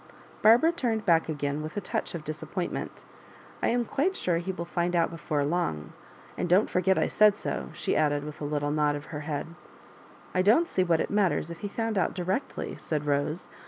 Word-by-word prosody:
Barbara 235 +10 +6
turned 235 -10 -1
back 165 -3 +3
again 145 -1 -2
with 155 +5 -6
a - - +2
touch 180 - -3
of 165 - -5
disappointment. 155 +4 -5 0.3
*' - - -22
I - - +2
am 240 0 +1
quite 360 +12 0
sure 175 - 0
he 185 +2 -3
will 170 -2 -5
find 175 +1 -1
out 170 -1 +2
before 155 -3 -1
long; 80 - -2 0.5
an<1 - - 0
don't 185 +5 +4
forget 185 +1 +2
I - - +2
said 210 -1 +5
so," - - -4
she - - -1
added, 145 -1 +2
with 150 0 -8
a - - -2
litth 145 0 -1
nod 145 0 +1
of 145 +1 -6
her 145 - -3
head. 145 -1 -3 0.5
'' - - -23
I 185 - +3
dob't 220 - +5
see 185 - +1
what 170 -3 +2
it - - -3
matters 195 -5 +1
if 170 - -8
he 205 - -4
found 225 0 -1
out 175 - 0
directly," 185 +7 -2
said 150 -2 -3
Rose. 145 +4 -1
170 Hz, 215 wpm, -28 LUFS, 150-200 Hz, 0.5 s, Barbara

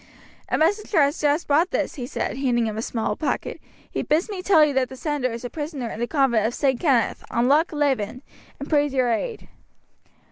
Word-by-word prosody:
"A - - +1
messenger 400 +3 +1
has 285 +3 0
just 295 +2 +1
brought 315 +5 +3
this," - - -1
he 245 -3 -6
said, - - -3
handing 245 -3 +1
him 215 -1 -3
a 220 - -3
small 225 -2 -2
packet. 290 - -3 0.3
"He - - -2
bids 330 +8 0
me 380 -3 -4
tell 355 -5 +5
you 295 - -1
that 260 -1 +1
the 265 - -9
sender 280 -2 -2
is 235 +2 -6
a - - -3
prisoner 290 -6 -5
in - - -7
the 240 - -1
convent 245 -7 +2
of 240 - -4
St. 265 -4 +1
Kenneth, 265 -9 +1
on 235 +1 +1
Loch 305 +5 +3
Leven, 265 -5 -1 0.4
and 280 - -6
prays 290 -2 +2
your 255 -2 +2
aid." 450 - -3
280 Hz, 215 wpm, -23 LUFS, 240-305 Hz, 0.4 s, tell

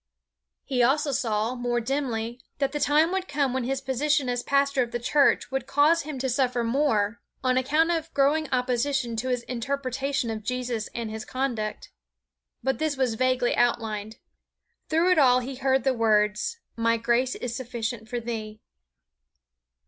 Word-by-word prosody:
He 255 -3 0
also 280 +4 +3
saw, 230 -3 0
more 245 -1 -1
dimly, 240 -2 -2 0.2
that 275 -1 0
the 295 - -3
time 305 +4 +3
would 380 0 -2
come 280 -3 0
when 260 -2 -1
his 270 +1 -2
position 270 +1 +1
as 245 0 -1
pastor 280 0 +2
of 240 - -1
the - - -1
church 280 +4 +2
would 270 -1 -2
cause 300 +4 +4
him 300 -1 -6
to 265 +1 -1
suffer 250 -1 +1
more 230 -4 +1 0.2
on 255 -1 +2
account 300 +6 +2
of 325 -1 -2
growing 290 +2 +2
opposition 250 -1 0
to 255 +4 -2
his 245 -1 -1
interpretation 265 0 -2
of 220 -1 -4
Jesus 245 -1 -3
and 230 -2 -3
His 220 0 -5
conduct. 235 -5 -3 0.7
But 265 0 0
this 310 -3 -1
was 255 -3 +1
vaguely 255 +1 +1
outlined. 220 -2 0 0.7
Through 330 +3 +3
it 360 - +4
all 250 -3 +6
he 255 +1 -6
heard 265 0 +1
the 265 - +2
words 210 - +1 0.2
"My 230 0 +2
grace 240 +3 +1
is 240 -1 -4
sufficient 235 -2 -4
for 245 -1 -2
thee." 220 -2 -5
255 Hz, 165 wpm, -26 LUFS, 235-275 Hz, 0.7 s, all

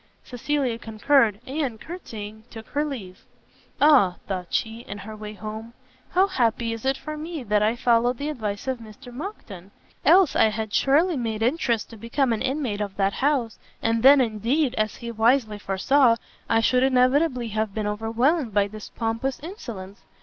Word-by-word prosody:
Cecilia 255 -1 -2
concurred, 225 -1 +2
and, 265 -5 -3
courtsying, 220 - -8
took 225 -1 -10
her 295 +1 0
leave. 220 -11 -7 0.6
"Ah!" 265 -12 +5
thought 185 -3 -3
she, 225 0 -2
in 220 -3 -8
her 210 +2 -8
way 210 0 -8
home, 220 +3 -8 0.3
"how 370 +2 +4
happy 235 - 0
is 230 +3 -5
it 270 0 +1
for 305 +2 -6
me 310 -1 -6
that 210 -2 +1
I 215 +2 +2
followed 240 0 +2
the 285 +3 -3
advice 215 -6 -4
of 260 -2 -1
Mr 225 +2 -12
Monckton! 235 - -8 0.3
else 345 +2 +5
I - - +5
had 220 -1 -2
surely 310 +5 +3
made 225 -3 -2
interest 245 -4 0
to 225 - -10
become 235 +3 0
an 220 - -3
inmate 265 -6 -1
of 200 -2 -4
that 195 0 +1
house, 265 -5 0 0.2
and 225 0 0
then 270 +2 +8
indeed, 245 +5 0
as 215 -3 -1
he 235 -2 -6
wisely 225 -1 +2
foresaw, 230 +6 +3 0.3
I 225 0 +3
should 250 +2 +3
inevitably 255 0 +2
have 215 -1 -2
been 215 -1 -2
overwhelmed 225 - 0
by 200 -1 +3
this 215 +1 -9
pompous 230 +3 -2
insolence! 230 - -8
230 Hz, 170 wpm, -24 LUFS, 215-270 Hz, 0.6 s, then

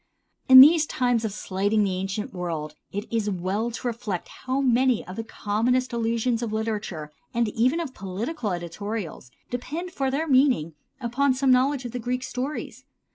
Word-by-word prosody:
In 260 0 +12
these 310 +2 +7
times 245 -3 +1
of 220 - -1
slighting 205 +1 0
of - - +3
the 190 -2 -1
ancient 195 +3 -4
world 165 -4 -4 0.2
it 205 +2 -4
is 220 -2 0
well 195 +5 -1
to 240 - -7
reflect 230 -6 -4
how 260 +1 -3
many 255 -2 +2
of 185 - -8
the 225 - -4
commonest 235 +4 0
allusions 230 +1 0
of 230 -3 -3
literature, 210 -8 -3 0.2
and 235 -1 +2
even 250 +9 +1
of 310 -6 -4
political 210 - -4
editorials, 175 - -5 0.2
depend 310 +9 -4
for 270 -5 -1
their 295 +5 -1
meaning 255 - +3 0.3
upon 260 +2 +1
some 265 0 +2
knowledge 260 +1 +2
of 240 - -4
the 250 - -4
Greek 250 +2 -2
stories. 260 +4 -5
230 Hz, 175 wpm, -25 LUFS, 205-255 Hz, 0.3 s, In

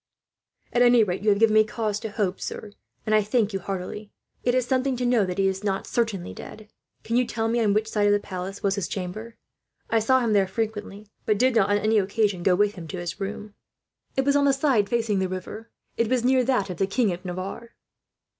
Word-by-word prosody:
"At 245 - +2
any 240 -2 +6
rate, 185 -3 -2
you 210 - +2
have 200 - +4
given 220 0 +4
me 215 0 +6
cause 215 -2 -3
to 220 - -5
hope, 205 -3 -2
sir, 210 - -6 0.3
and 215 - 0
I 215 - +5
thank 210 0 0
you 195 - -1
heartily. 195 +2 -5 0.3
It 245 0 +2
is 255 -1 +2
something 260 0 0
to 250 - -1
know 240 -5 +3
that 180 - -4
he 195 -1 +3
is 190 +1 -2
not 195 -2 -1
certainly 220 -7 -2
dead. 215 -1 -11 0.3
"Can 230 +2 0
you 250 - +3
tell 225 -1 -2
me 235 +1 +1
on 215 -3 +2
which 215 +1 +1
side 210 -2 +1
of - - +4
the 205 - +3
palace 190 0 -7
was 200 -1 +2
his 200 -4 -2
chamber? 215 +5 -6 0.5
I 225 - +4
saw 260 +4 +3
him 230 -3 +1
there 195 -2 +3
frequently, 210 0 -4 0.2
but 215 - +3
did 255 +2 +2
not, 205 -3 +3
on 205 - +3
any 215 +1 +2
occasion, 200 -1 0
go 180 +1 +3
with 205 +2 +2
him 175 -5 -9
to 185 - -6
his 175 +2 -5
room." 210 +1 -5 0.6
"It 265 - +2
was 280 0 +3
on 285 0 +4
the 275 - +4
side 270 -7 +2
facing 225 -4 0
the 190 -1 -1
river. 185 +5 -7 0.3
It 230 - +2
was 250 -2 +1
near 255 0 +4
that 215 -7 0
of 175 - -7
the 195 - +1
King 205 -1 +1
of 175 +1 -8
Navarre." 185 +6 -6
210 Hz, 240 wpm, -25 LUFS, 195-230 Hz, 0.6 s, any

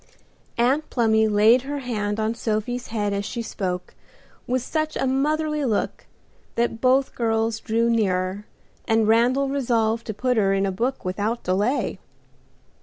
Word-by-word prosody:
Aunt 265 +6 +2
Plumy 220 -2 +3
laid 215 +4 +5
her 285 +2 -4
hand 215 -5 -2
on 220 +1 0
Sophie's 235 +2 -2
head 205 -2 -1
as 200 0 -1
she 230 +3 -4
spoke, 180 -4 -4 0.5
with 255 0 0
such 310 +2 -2
a - - 0
motherly 300 +3 0
look 225 -6 -2 0.5
that 235 -1 -1
both 260 +1 +3
girls 225 -1 0
drew 230 +1 0
nearer, 200 -3 0 0.4
and 225 -2 +3
Randal 245 +5 +3
resolved 235 -4 0
to 215 - -3
put 250 +2 0
her 195 -2 +3
in 195 0 +1
a 195 - 0
book 240 +6 -2
without 205 +6 -2
delay. 205 +9 0
230 Hz, 150 wpm, -23 LUFS, 210-255 Hz, 0.5 s, laid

